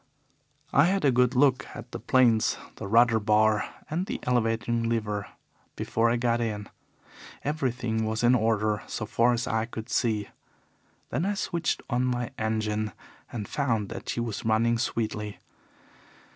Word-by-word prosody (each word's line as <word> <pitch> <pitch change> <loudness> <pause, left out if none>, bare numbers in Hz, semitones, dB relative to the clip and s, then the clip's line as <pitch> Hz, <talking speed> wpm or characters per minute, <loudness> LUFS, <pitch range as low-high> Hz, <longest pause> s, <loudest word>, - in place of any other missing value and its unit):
"I 145 - +6
had 190 -1 +1
a 140 - +5
good 125 0 +3
look 130 0 +3
at - - -9
the - - -5
planes, 120 -4 +3 0.2
the - - -5
rudder 115 +1 +5
bar, 110 -1 +3 0.2
and 175 +5 -2
the - - -3
elevating 115 -1 +1
lever 105 -3 -1 0.5
before 115 +1 +1
I 120 - +2
got 120 0 +1
in. 105 -3 -3 0.8
Everything 125 -6 -1
was 110 +1 -1
in 120 +1 +6
order 110 -3 +1
so - - -4
far 120 +1 +3
as 120 0 0
I 110 0 0
could 115 0 -7
see. 110 -5 0 0.8
Then 150 - 0
I 205 +2 0
switched 170 -4 -1
on 125 0 0
my 125 -1 -1
engine 110 -1 -1 0.4
and 105 -4 -4
found 115 -8 -1
that 115 +1 -7
she - - -1
was 115 -3 -3
running 115 +1 +2
sweetly. 105 -3 -2
115 Hz, 155 wpm, -27 LUFS, 110-125 Hz, 0.8 s, I